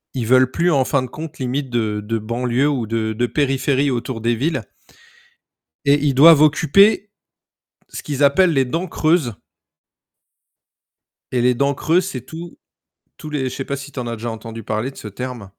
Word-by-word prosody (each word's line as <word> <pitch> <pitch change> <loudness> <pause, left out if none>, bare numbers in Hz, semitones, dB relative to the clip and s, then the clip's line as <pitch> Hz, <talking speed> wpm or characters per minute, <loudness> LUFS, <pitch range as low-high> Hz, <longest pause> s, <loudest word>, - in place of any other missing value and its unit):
Ils 120 -4 -2
veulent 130 0 +4
plus, 170 +4 +1
en 135 -3 +2
fin 140 - +1
de 130 - -5
compte, 155 +3 -9
limite 130 +1 -3
de 110 -3 -1
de 115 +2 -3
banlieue 120 +5 0
ou 130 -6 -1
de 110 0 -2
de 120 +3 0
périphérie 135 +1 0
autour 120 -2 -3
des 120 +1 +1
villes. 135 -1 -1 1.2
Et 140 +1 +5
ils 145 -1 0
doivent 155 +2 +8
occuper 195 +8 +4 0.8
ce - - -8
qu'ils 145 -1 -3
appellent 165 +5 +4
les 135 -2 +2
dents 165 +8 -3
creuses. 155 - +1 2.0
Et 125 -2 0
les 125 0 +3
dents 140 +3 +1
creuses, 170 +6 +1
c'est 130 -8 -5
tous 165 +1 -9 0.6
tous 155 - -8
les 145 -3 -2
je - - -7
sais 135 - -4
pas 140 - -3
si 140 +1 -9
tu 130 - -5
en 120 - -5
as 115 -1 -4
déjà 115 +2 -5
entendu 115 0 -8
parler 110 +5 -3
de 135 - -19
ce 105 - -8
terme? 120 -1 -7
130 Hz, 190 wpm, -20 LUFS, 120-150 Hz, 2.0 s, doivent